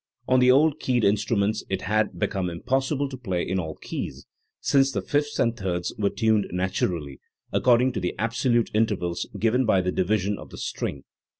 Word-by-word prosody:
On 130 - +4
the 125 0 +5
old 150 +3 +4
keyed 125 -5 +1
instruments 105 +1 +1
it 95 -1 -2
had 105 -2 0
become 95 0 -1
impossible 135 - -1
to 135 -1 -7
play 95 -8 -2
in 95 +1 0
all 80 -3 -4
keys, - - -6 0.3
since 135 -1 +3
the - - -2
fifths 145 0 -1
and 115 -1 +2
thirds 90 -4 -2
were 100 -2 +1
tuned 110 -2 +1
naturally, 90 -6 -2 0.3
according 125 +1 +4
to 120 - -3
the 90 -1 -2
absolute 115 +1 +1
intervals 105 -6 0
given 115 +4 +2
by 110 -5 +3
the 90 0 0
divisions 100 +2 0
of - - -10
the - - -11
string. 70 - -4
110 Hz, 180 wpm, -25 LUFS, 95-125 Hz, 0.3 s, the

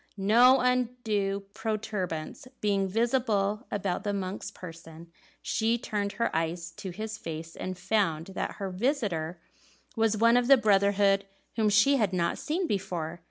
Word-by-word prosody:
No 240 +7 +5
undue 230 -6 0
protuberance 215 -5 -4
being 200 -2 +1
visible 220 0 0
about 195 -3 -2
the 205 - -1
monk's 190 0 -4
person, 165 -1 -11 0.3
she 225 +1 +1
turned 205 -4 -3
her 235 -5 -1
eyes 165 +1 -2
to 190 - -6
his 215 +4 -6
face, 165 0 -7
and 185 0 -5
found 185 -4 0
that - - -3
her 195 -2 -5
visitor 185 - -1 0.6
was 220 -1 +2
one 230 +2 +5
of 245 -1 +2
the 275 0 +8
brotherhood 200 -2 +3 0.3
whom 220 -2 +2
she 210 +7 +5
had 210 -6 +1
not 170 -2 0
seen 345 +5 -1
before. 175 - -3
200 Hz, 145 wpm, -28 LUFS, 185-225 Hz, 0.6 s, the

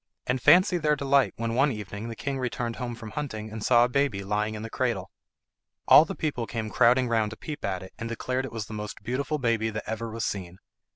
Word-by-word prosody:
And 125 0 -1
fancy 180 - +6
their 150 -1 +2
delight 140 -1 +2
when 115 0 -2
one 135 +4 +3
evening 105 0 -6
the 115 - -6
king 140 +3 -3
returned 120 -2 -3
home 120 -2 -4
from 115 -2 -9
hunting 110 -8 -5
and 110 -1 -6
saw 120 0 +5
a - - +3
baby 125 -6 0
lying 105 +2 -1
in 105 - -6
the 115 - -5
cradle. - - -1 0.8
All 155 - +9
the 195 - -5
people 130 -7 -2
came 110 -2 -4
crowding 125 +4 +4
round 110 -2 +1
to 110 - -9
peep 150 -1 -7
at 95 -1 -2
it, 95 - -12
and 115 0 -4
declared 125 +2 -2
it - - -7
was 115 -2 -4
the 110 - -9
most 105 0 -6
beautiful 140 +5 -1
baby 115 -4 +1
that 110 0 -5
ever 110 +1 -3
was 110 -1 -3
seen. 90 -2 -4
115 Hz, 235 wpm, -27 LUFS, 110-130 Hz, 0.8 s, All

